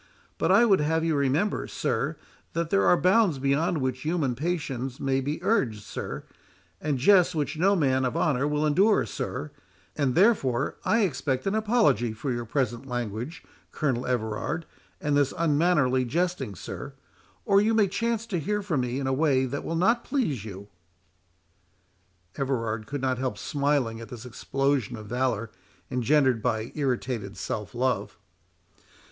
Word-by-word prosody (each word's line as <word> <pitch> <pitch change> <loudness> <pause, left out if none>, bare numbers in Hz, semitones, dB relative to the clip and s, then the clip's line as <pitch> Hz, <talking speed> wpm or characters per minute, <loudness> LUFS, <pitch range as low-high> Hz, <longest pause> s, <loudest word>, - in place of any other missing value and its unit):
But - - +2
I 210 +5 +6
would 195 -7 +4
have 160 +2 +1
you 165 -1 +1
remember, 140 +8 +1
sir, - - -1 0.4
that 165 -1 -2
there 195 - +3
are 180 - +6
bounds 185 -3 +3
beyond 145 +6 +1
which 130 0 -2
human 155 -4 0
patience 135 -4 -3
may 135 0 +1
be 145 +3 -2
urged, 125 - +1
sir—and 90 - -6
jests 180 +5 +5
which 150 +1 -1
no 190 +5 +3
man 130 -6 +2
of 125 -2 -1
honour 140 -1 +1
will 150 +1 0
endure, 195 +8 +4
sir—and 130 - -5
therefore 150 - +2
I 230 - +3
expect 140 -8 -1
an 195 - 0
apology 215 - +2
for 130 +5 -3
your 120 -1 -3
present 125 0 -2
language, 120 - -4 0.3
Colonel 130 -5 -1
Everard, 120 +6 -2 0.3
and 145 -1 0
this 145 -1 +2
unmannerly 150 -5 +3
jesting, 150 - -1
sir—or 200 - -3
you 220 +2 +2
may 210 -3 +4
chance 230 +3 -1
to 185 -6 -2
hear 210 +7 -1
from 165 -9 0
me 125 +1 -2
in 135 - -3
a 135 - +1
way 135 -2 +2
that 140 +3 -4
will 165 - -3
not 230 +8 +2
please 210 - -1
you." 100 -2 -8 1.7
Everard 115 -6 -2
could 145 -1 -4
not 130 -1 0
help 130 -5 -2
smiling 140 -4 0
at 115 - -9
this 120 -2 -9
explosion 135 0 -1
of 105 - -9
valour, 115 -1 -1 0.4
engendered 130 -1 +2
by 110 -1 -1
irritated 125 -7 -2
self 105 +2 -4
love. 125 -5 -1
135 Hz, 155 wpm, -27 LUFS, 125-170 Hz, 1.7 s, I